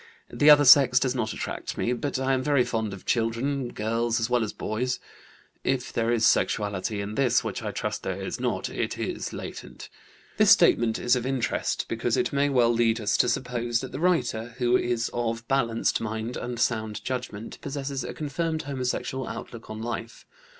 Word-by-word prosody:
The 150 - +5
other 145 -1 +8
sex 125 -2 +8
does 130 -1 0
not 115 -4 -1
attract - - -5
me, 120 - 0
but 140 +3 -2
I 135 0 +1
am 130 - +1
very 140 -2 +3
fond 110 -3 -2
of 95 - -9
children, 120 +4 0
girls 115 +1 -1
as 115 +2 -2
well 120 -2 +3
as 105 - -3
boys. 125 +4 -2 0.6
(If 130 -1 -1
there 115 0 +1
is 115 -2 +2
sexuality 100 -1 +1
in 100 +1 -5
this, 130 -1 +2
which - - -4
I - - -3
trust - - -3
there - - -4
is - - -4
not, - - -1
it - - -3
is - - -3
latent)." - - -8 0.5
This - - +5
statement 115 -1 +5
is 120 +1 +2
of 125 0 -2
interest 135 -3 -1
because - - -1
it - - 0
may 140 +1 +2
well 120 -3 +3
lead 115 0 +2
us 105 -2 0
to 125 - +3
suppose 120 -2 -1
that 130 - -7
the 135 - -5
writer, 120 -10 0
who 125 -1 +2
is 120 -2 0
of 115 -1 -2
balanced 120 -4 +1
mind 110 +2 -4
and 120 -1 -5
sound 110 -3 -1
judgment, 125 -4 -5
possesses 135 -1 -4
a - - -5
confirmed 160 +2 -3
homosexual 130 -1 -3
outlook 115 -1 -8
on 110 +1 -6
life. 115 0 -6
120 Hz, 190 wpm, -26 LUFS, 115-130 Hz, 0.6 s, other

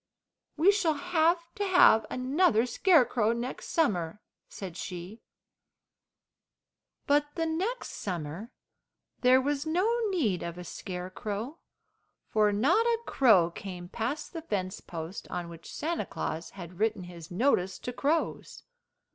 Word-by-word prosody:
"We 345 +6 +6
shall 345 -7 +1
have 340 +2 +2 0.2
to 410 - -3
have 360 - +6
another 255 - +2
scarecrow 245 - +3
next 240 +2 -5
summer," 195 - 0 0.3
said 185 -4 -7
she. 180 +4 -7 1.8
But 290 +1 +3
the 330 - 0
next 375 +10 -2
summer 175 +3 -5 0.7
there 255 +1 +6
was 285 +2 -1
no 355 +6 +2 0.2
need 245 - 0
of 170 0 -5
a 180 - -7
scarecrow, 200 - -5 0.7
for 210 -1 +4
not 280 - +3
a 470 -1 +3
crow 200 -10 +4
came 180 -1 -8
past 240 +9 -3
the 330 - -5
fence 190 - -3
post 165 +2 -7
on 175 -1 -4
which 165 -1 -11
Santa 335 +2 -2
Claus 160 +2 -4
had 175 0 -9
written 215 -3 +1
his 170 -2 -10
notice 190 -2 +1
to 245 - -6
crows. 300 +6 -1
225 Hz, 130 wpm, -29 LUFS, -, 1.8 s, We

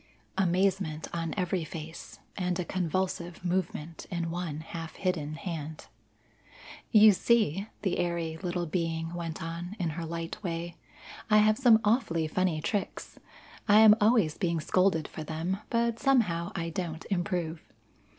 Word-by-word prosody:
Amazement 185 -3 +1
on 165 -1 -2
every 180 -2 0
face 160 +1 -8 0.2
and 180 -2 -1
a 180 - -1
convulsive 180 0 -2
movement 170 -3 -2
in 170 -2 -2
one 165 -3 -4
half 165 0 -7
hidden 160 -5 -2
hand. 160 -3 -6 1.0
"You 215 0 +8
see," 205 -2 +2 0.2
the 190 -4 0
airy 170 -2 -1
little 175 -1 -2
being 165 0 -2
went 165 -2 -4
on, 170 +4 -5
in 170 -4 -1
her 165 +2 -5
light 165 +5 -5
way, 170 -2 -4 0.5
"I 215 - +6
have 215 +2 +4
some 240 -4 +6
awfully 190 -8 +2
funny 175 -1 0
tricks. 200 +4 -3 0.5
I 210 +1 +7
am 215 -1 +9
always 210 -8 +3
being 170 -4 0
scolded 175 -1 +2
for 155 - -7
them, 165 +5 -2
but 235 -1 +1
somehow 210 -12 +2
I 165 -2 -2
don't 165 -2 -4
improve. 175 -3 -1
175 Hz, 140 wpm, -29 LUFS, 165-195 Hz, 1.0 s, am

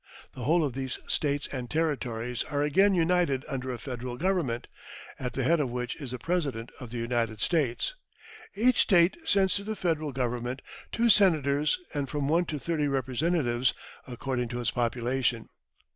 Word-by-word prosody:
The 125 - -6
whole 165 +4 +4
of 140 -4 -1
these 130 0 -3
States 145 -1 0
and 125 -3 -4
Territories 125 -7 -1
are 145 -1 -1
again 190 +7 +4
united 170 -5 +2
under 130 -3 -3
a 125 - -4
Federal 125 0 -5
Government, 165 -9 0 0.5
at 125 -2 -3
the 135 - -1
head 165 +6 +3
of 140 -4 0
which 125 0 -3
is 140 -4 -6
the 125 - -4
President 140 -6 -2
of 125 - -8
the 120 - -5
United 115 -2 -1
States. 145 - +1 0.6
Each 245 +5 +3
State 175 -2 +5
sends 195 - +3
to 200 - -5
the 215 +1 -3
Federal 160 -6 -1
Government 125 0 -2 0.3
two 235 +1 +2
Senators 155 - +4 0.2
and 140 -3 -2
from 145 -2 -1
one 170 +4 +3
to 155 - -3
thirty 150 +1 -1
Representatives, 130 -1 +1 0.3
according 125 0 -2
to 120 +1 -4
its 120 - 0
population. 120 0 0
135 Hz, 170 wpm, -28 LUFS, 125-165 Hz, 0.6 s, State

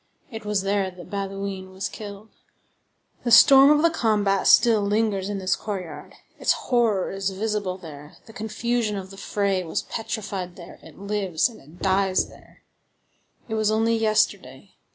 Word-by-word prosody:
It 225 -2 -8
was 210 -2 0
there 195 -1 0
that 180 +1 -13
Bauduin 195 -1 -4
was 190 +1 -3
killed. 205 0 -9 0.9
The 240 - -1
storm 270 +4 +8
of 300 +1 +4
the 335 - +4
combat 210 - +1
still 230 -2 +6
lingers 205 -1 0
in 205 - -3
this 185 -1 0
courtyard; 185 -7 -7 0.2
its - - +3
horror 230 -7 0
is 195 0 -2
visible 205 -1 -2
there; 150 -5 -11
the 225 - -14
confusion 220 0 -2
of 190 0 -7
the 195 - -11
fray 195 -2 -1
was 165 - -3
petrified 205 -5 -5
there; 175 -1 -12
it - - -15
lives 200 -2 0
and 230 - -14
it 155 +6 -15
dies 190 -1 +2
there; - - -19 0.8
it 220 - -5
was 215 -1 +1
only 225 +1 +2
yesterday. 220 -1 0
200 Hz, 160 wpm, -24 LUFS, 190-220 Hz, 0.9 s, storm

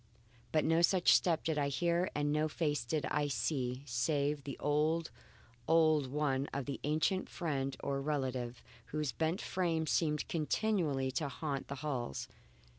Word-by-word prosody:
But 155 - +2
no 165 +1 +3
such 180 +1 +5
step 165 -3 +3
did 160 -2 0
I 140 - +1
hear, 170 +5 +1
and 145 0 +1
no 155 +1 +2
face 150 -5 -1
did 145 +3 -1
I 150 0 +1
see 135 -2 -1
save 140 +3 0
the 140 - -5
old, 155 +3 +1 0.6
old 155 -3 +4
one 140 0 0
of 140 -2 -3
the 140 - -4
ancient 155 +6 +1
friend 135 -6 -2
or 140 0 -1
relative, 130 -4 -2 0.2
whose 150 -3 -2
bent 160 +3 -1
frame 165 -3 0
seemed 150 -1 +1
continually 155 -5 0
to 140 +3 -1
haunt 140 0 -3
the 140 - -4
halls. 125 - -3
150 Hz, 155 wpm, -34 LUFS, 135-160 Hz, 0.6 s, such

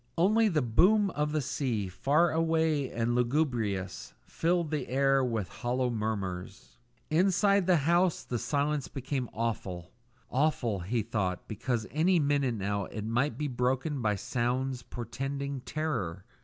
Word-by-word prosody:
Only 215 +6 +4
the 160 -8 +1
boom 195 - +4
of 150 -1 -1
the 155 0 0
sea, 125 -6 -1
far 145 - +2
away 160 -4 +1
and 115 +1 -1
lugubrious, 120 - -1
filled 170 -1 0
the 150 -4 -2
air 135 +1 +3
with 115 -6 -1
hollow 125 +5 -1
murmurs. 100 -3 -4 0.3
Inside 195 +3 +3
the 185 - +5
house 175 +1 +3
the 120 - -3
silence 140 +3 0
became 130 -2 -3
awful; 95 -6 -3 0.4
awful, 130 -7 +1
he 110 +6 -1
thought, 100 -5 -2
because 115 +1 -2
any 170 +7 +3
minute 140 -5 +1
now 100 -1 -2
it 105 +2 -6
might 120 +7 0
be 150 - -1
broken 130 +3 -1
by 105 -2 +1
sounds 125 +4 -1
portending 135 +4 -4
terror. 100 - -3
130 Hz, 140 wpm, -30 LUFS, 110-155 Hz, 0.4 s, the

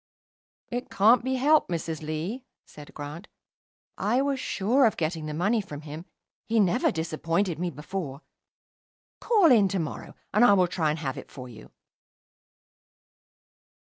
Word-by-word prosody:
"It 245 +1 -4
can't 225 +5 +4
be 260 +1 -1
helped, 295 +4 +3
Mrs. 165 -2 -3
Lee," 160 - -4 0.2
said 150 -1 -13
Grant. 150 +6 -8 0.7
"I 225 +6 +1
was 280 -1 -1
sure 245 +6 +2
of 220 - -2
getting 160 -1 -2
the 150 - -4
money 205 +7 +1
from 150 -7 -9
him. 155 +2 -8 0.4
He 225 0 +2
never 185 -4 +3
disappointed 165 +2 -1
me 180 0 -1
before. 150 -1 -6 1.0
Call 405 - +4
in 215 -5 +6
to 190 - -2
morrow, 160 -4 -5 0.2
and 210 +4 +4
I 245 - +7
will 185 -2 +4
try 170 -3 -1
and 150 - -1
have 135 -5 -4
it - - -12
for 130 -2 -9
you." 110 -3 -13
180 Hz, 150 wpm, -26 LUFS, 155-225 Hz, 1.0 s, I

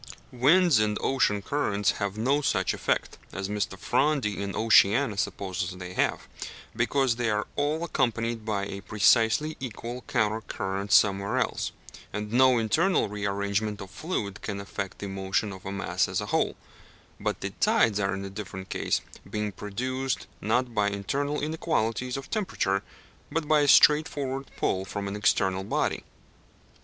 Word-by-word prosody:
Winds 150 +3 +5
and 105 -1 +1
ocean 105 -7 +1
currents 105 -8 +1
have 100 0 -2
no 135 +6 +2
such - - +1
effect - - -1
(as 95 0 -4
Mr. 105 -1 -2
Fronde 135 +4 +1
in 100 -1 -3
Oceania 110 +2 +4
supposes 95 -2 -3
they 90 0 -7
have), - - 0 0.5
because 125 +1 +1
they 120 -2 0
are 105 0 0
all 150 +3 0
accompanied 115 -7 -1
by 105 -2 -1
a 100 0 -6
precisely 110 +8 +3
equal 120 0 -6
counter 110 -5 +1
current 95 -1 -4
somewhere 100 0 +4
else, - - -1 0.4
and 105 +1 -4
no 130 0 +5
internal 155 - +2
rearrangement 100 +1 -1
of 95 -2 -9
fluid 105 - -4
can 100 -2 -4
affect 100 -1 -5
the 100 - -5
motion 95 +1 -1
of 95 0 -10
a - - -3
mass 100 -1 0
as - - -1
a - - -3
whole; - - +2 0.6
but - - -2
the - - -3
tides 105 -3 +3
are 100 -1 0
in 100 0 -5
different 95 -2 -7
case, - - 0 0.3
being 105 -1 -2
produced, 130 +7 -3 0.2
not 120 +3 0
by 105 -2 +2
internal 140 +9 -2
inequalities 125 -6 -1
of 135 - -7
temperature, 100 - 0 0.5
but 155 0 -1
by 155 0 +5
a 145 - +3
straightforward 140 -2 +4
pull 95 - 0
from 100 +1 -5
an 100 - -4
external 95 -2 +1
body. 100 - -1
105 Hz, 155 wpm, -27 LUFS, 100-130 Hz, 0.6 s, Winds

